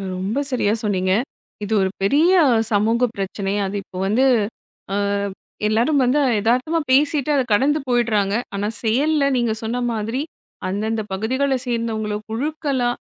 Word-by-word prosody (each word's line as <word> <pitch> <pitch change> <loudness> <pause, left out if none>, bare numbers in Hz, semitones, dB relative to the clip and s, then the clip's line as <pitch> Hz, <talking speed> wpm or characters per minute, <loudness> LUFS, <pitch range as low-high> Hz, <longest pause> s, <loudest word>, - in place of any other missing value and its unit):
ரொம்ப 195 +8 -2
சரியா 215 -5 +1
சொன்னீங்க, 190 -3 0 0.5
இது 205 +2 -2
ஒரு 190 - +1
பெரிய 295 - +4 0.4
சமூக 225 +4 +2
பிரச்சனை. 195 0 -3
அது 195 - -5
இப்போ 185 0 -9
வந்து 235 +7 +3 0.7
ஆ, - - 0 0.7
எல்லாரும் 240 +7 +2
வந்து 255 +4 +2 0.2
எதார்த்தமா 255 +9 +1
பேசிட்டு 290 +1 +3
அத 275 - +3
கடந்து 285 +8 +3
போயிடுறாங்க, 220 -5 +1 0.2
ஆனா 200 +1 -1 0.2
செயல்ல 280 +7 +2
நீங்க 235 -2 +1
சொன்ன 235 +3 -2
மாதிரி 225 +4 -2 0.5
அந்தந்த 215 +4 -1
பகுதிகளை 260 +7 0
சேர்ந்தவங்கள 225 -3 -2
குழுக்களா 275 +1 -1
230 Hz, 130 wpm, -21 LUFS, 205-270 Hz, 0.7 s, பெரிய